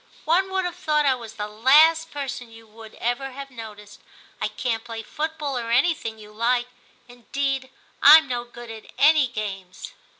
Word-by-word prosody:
One 375 +4 +2
would 380 -1 0
have 355 - -4
thought 300 -1 +1
I 270 - +4
was 230 -3 -9
the 210 -1 -4
last 305 +9 +4
person 275 -5 -6
you 225 0 -15
would 220 0 -14
ever 245 +3 -3
have 275 +1 -9
noticed. 210 -4 -11 0.4
I - - +1
can't 225 -3 -3
play 225 -1 -7
foot 315 +6 -4
ball, 280 -4 -3
or 230 -1 -6
anything 245 -2 +1
you 210 -1 -13
like; 240 +3 0 0.4
indeed, 260 +2 -3 0.3
Fm 315 +2 +9
no 245 -2 -3
good 240 -1 -11
at 220 -1 -11
any 300 -1 +5
games.' 195 -5 -7
245 Hz, 175 wpm, -23 LUFS, 225-290 Hz, 0.4 s, Fm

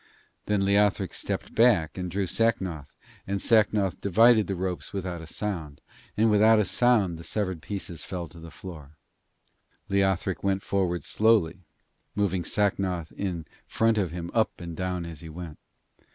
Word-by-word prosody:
Then 105 -2 +1
Leothric 100 -1 +2
stepped - - -4
back 110 -9 +4
and 90 -1 -4
drew 95 +3 -1
Sacnoth, 90 -8 -1 0.3
and 100 +1 -1
Sacnoth 105 -3 +2
divided 110 +2 +5
the 95 - -2
ropes 90 0 -4
without 90 -3 -4
a 80 - -10
sound, 80 -6 -4 0.4
and 110 +1 +4
without 110 +2 +6
a 105 - +3
sound 105 -7 +2
the - - -9
severed 95 -4 -2
pieces 90 -6 -5
fell 90 -2 -5
to 85 - -13
the 85 0 -10
floor. 80 -1 -11 0.9
Leothric 95 -1 +1
went 95 -1 0
forward 90 -5 -1
slowly, 105 -5 +2 0.6
moving 95 -3 0
Sacnoth 95 -5 0
in 90 -5 -4 0.2
front 115 -1 +2
of 95 -4 0
him 85 0 -6
up 110 -2 +1
and 85 -2 -7
down 90 0 -3
as 80 -3 -8
he 80 - -9
went. 80 -1 -8
95 Hz, 155 wpm, -27 LUFS, 85-105 Hz, 0.9 s, without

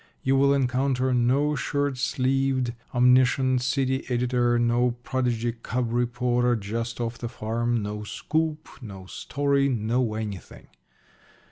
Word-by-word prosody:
You 135 +1 +2
will 140 +1 +4
encounter 130 -1 +1
no 130 +5 +2
shirt 145 -1 -1
sleeved, 130 -1 0 0.2
omniscient 125 +1 +3
city 130 +1 0
editor, 120 -1 +1
no 120 +1 +2
prodigy 120 -3 -1
"cub" 115 +1 -3
reporter 120 0 +1
just 115 +3 -4
off 120 0 -3
the 120 - -4
farm, 115 0 -1
no 105 +1 -4
scoop, 155 +7 -2
no 100 -5 -9
story 140 +7 0
no 115 -1 0
anything. 105 -4 -7
125 Hz, 120 wpm, -25 LUFS, 120-130 Hz, 0.2 s, will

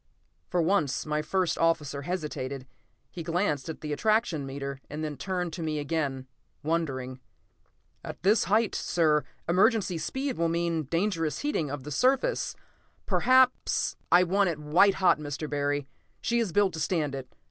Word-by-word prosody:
For 175 -2 +1
once 160 -6 +1
my 150 0 0
first 180 +2 0
officer 155 -4 +1
hesitated. 140 -5 -4 0.5
He 175 - -6
glanced 165 -4 -1
at 160 - -6
the 150 -1 -3
attraction 215 -6 +1
meter 140 0 -5
and 150 +2 -5
then 150 -1 -3
turned 180 0 -3
to 170 - -5
me 155 -1 -2
again, 145 -3 -2 0.4
wondering. 135 -5 -2 0.8
"At - - -8
this 210 +4 +4
height, 215 +1 +2
sir, 155 -3 +2 0.2
emergency 185 0 +3
speed 265 - -3
will 170 0 +2
mean 170 -2 0
dangerous 165 0 -1
heating 285 - -1
of 140 -1 -5
the 150 - -7
surface; 265 - +1 0.5
perhaps 255 0 +3
" - - -40
"I 180 +1 +7
want 195 +2 +2
it 165 - -2
white 155 +7 +4
hot, 185 -4 +3
Mr. 150 +1 -4
Barry. 145 -1 -1 0.3
She 235 0 0
is 225 -6 0
built 200 0 +3
to 160 - -5
stand 155 -4 0
it. 135 -2 -7
165 Hz, 160 wpm, -28 LUFS, 145-190 Hz, 0.8 s, I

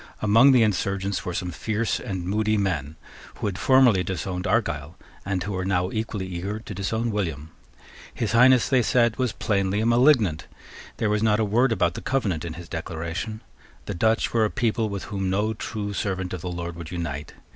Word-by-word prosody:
Among 115 +6 +6
the 125 -3 +5
insurgents 100 -1 -1
were 90 - -3
some 90 0 -3
fierce 110 +6 -1
and 95 -3 -4
moody 110 +3 +1
men 80 -7 -1 0.4
who - - -5
had 95 -2 -2
formerly 125 -8 +5
disowned 90 +1 -3
Argyle, 85 - -1 0.3
and 95 -1 -2
who 100 - -4
were 95 -1 -2
now 90 -1 0
equally 110 -3 -3
eager 95 +3 -4
to 110 -1 -8
disown 110 +5 -2
William. 80 -7 -3 0.6
His 115 - -2
Highness, 125 +1 +5
they 130 -2 +3
said, 120 -1 +2
was 130 -3 0
plainly 100 -1 0
a 110 - 0
malignant. 115 - +3 0.5
There 105 -2 0
was 105 0 +1
not 110 -1 +3
a 110 - +2
word 120 +5 +2
about 90 -5 +1
the - - -7
Covenant 100 -12 -1
in 85 -2 -5
his 85 +1 -9
Declaration. 85 +6 -5 0.4
The - - -4
Dutch 110 +5 +1
were 115 -1 +3
a 105 - +2
people 115 -1 0
with 100 -2 -4
whom 95 -2 -3
no 105 +4 0
true 105 -1 -5
servant 95 -2 -2
of 90 - -5
the 90 - -4
Lord 85 -1 -5
would 85 -2 -7
unite. 75 -5 -5
100 Hz, 195 wpm, -24 LUFS, 90-110 Hz, 0.6 s, Among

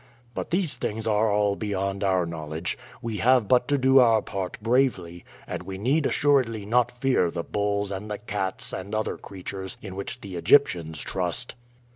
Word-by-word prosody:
But - - -4
these 170 -7 0
things 110 -1 -3
are 110 0 +2
all 100 -1 +2
beyond 100 -2 -2
our 95 -2 +2
knowledge. 80 0 -4 0.3
We 115 -2 -3
have 125 -2 +4
but 125 +1 +4
to 145 - +2
do 130 0 +5
our 115 -4 +5
part 95 -2 -4
bravely, 110 -8 0 0.2
and - - -5
we 95 -1 -7
need 135 +9 +2
assuredly 130 -8 +2
not 120 +3 +3
fear 125 -7 +1
the 85 0 -4
bulls 100 0 -1
and 100 +2 -5
the 105 - -3
cats 100 -4 -3
and 100 +3 -4
other 110 - -1
creatures 95 0 -7
in 95 -3 -8
which 105 +5 -5
the 95 -3 -7
Egyptians 85 - +3
trust." 95 +6 -2
105 Hz, 175 wpm, -26 LUFS, 95-120 Hz, 0.3 s, do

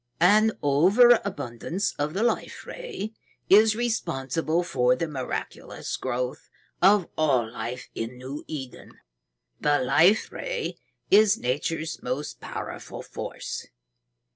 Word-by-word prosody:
"An 215 +5 +5
overabundance 190 - +3
of 150 +3 -1
the 205 - +1
Life 240 - -1
Ray 445 - -6 0.4
is 215 +2 +7
responsible 165 - -1
for 125 -7 +2
the 165 +6 -2
miraculous 135 -4 -5
growth 125 +1 -3 0.3
of 195 0 +5
all 130 -8 +2
life 120 +2 -5
in 115 +2 -5
New 135 +4 -7
Eden. 135 -5 -8 0.7
The 145 0 +3
Life 160 +11 +4
Ray - - -4 0.3
is 210 +1 +6
Nature's 155 - -2
most 130 +4 -4
powerful - - -7
force. - - -6
160 Hz, 110 wpm, -26 LUFS, 130-210 Hz, 0.7 s, is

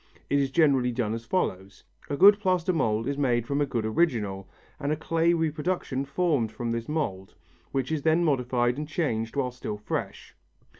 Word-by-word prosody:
It 140 - +4
is 135 -1 +1
generally 135 -5 +3
done 115 -3 -1
as 115 0 -5
follows. 100 - -2 0.3
A 145 - -2
good 205 +4 +8
plaster 185 -2 +1
mould 115 -8 0
is 140 0 -2
made 120 -4 +1
from 140 +2 -1
a 145 - +1
good 115 -4 -2
original, 110 - 0 0.3
and 145 - -1
a - - +2
clay 165 +2 +1
reproduction 160 -3 -1
formed 140 -6 0
from 120 0 -4
this 115 +2 -3
mould, 105 -12 -3 0.4
which 135 +1 -2
is 155 -2 -1
then 160 +3 +3
modified 125 -3 +1
and 150 0 -5
changed 115 -9 -2
while 130 -3 0
still 120 -4 -6
fresh. 105 - -5
135 Hz, 185 wpm, -27 LUFS, 115-160 Hz, 0.4 s, good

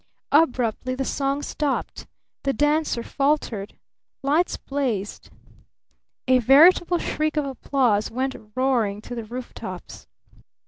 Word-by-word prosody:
Abruptly 255 -4 +2
the 270 +1 -2
song 275 +2 -1
stopped! 290 -3 -3 0.3
The 275 - 0
dancer 295 -3 +1
faltered! 275 -9 -1 0.5
Lights 305 +6 +1
blazed! 245 -8 -3 1.0
A 255 0 +5
veritable 335 +8 +6
shriek 310 -2 -2
of 295 - +1
applause 255 -5 0
went 260 +3 -2 0.2
roaring 240 -6 +1
to - - -8
the 230 -2 -5
roof 245 +3 -7
tops! 185 - -9
265 Hz, 110 wpm, -24 LUFS, 235-290 Hz, 1.0 s, veritable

